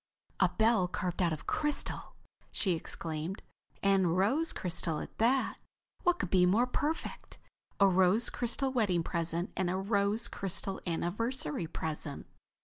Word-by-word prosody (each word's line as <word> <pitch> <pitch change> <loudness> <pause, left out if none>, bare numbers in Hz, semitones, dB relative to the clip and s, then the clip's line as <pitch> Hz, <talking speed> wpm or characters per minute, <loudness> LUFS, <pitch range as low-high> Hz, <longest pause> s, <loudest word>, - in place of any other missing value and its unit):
"A 185 - +5
bell 220 0 +3
carved 180 0 -3
out 175 -2 +3
of 155 - -5
crystal!" 295 -1 -1 0.4
she 195 - 0
exclaimed. 165 +2 -3 0.4
"And 190 -3 +3
rose 270 - +2
crystal 165 -3 -1
at - - -8
that. 255 +4 +2 0.4
What 355 0 +3
could 185 - -3
be 180 -1 +5
more 220 +7 +4
perfect? 295 +5 -3 0.4
A 200 - +7
rose 190 +4 +4
crystal 250 +3 0
wedding 200 -9 +1
present 170 +2 -2
and 185 -2 0
a 185 - 0
rose 200 +3 +1
crystal 195 -2 -3
anniversary 175 - -2
present!" 155 -2 -4
190 Hz, 140 wpm, -32 LUFS, 175-230 Hz, 0.4 s, A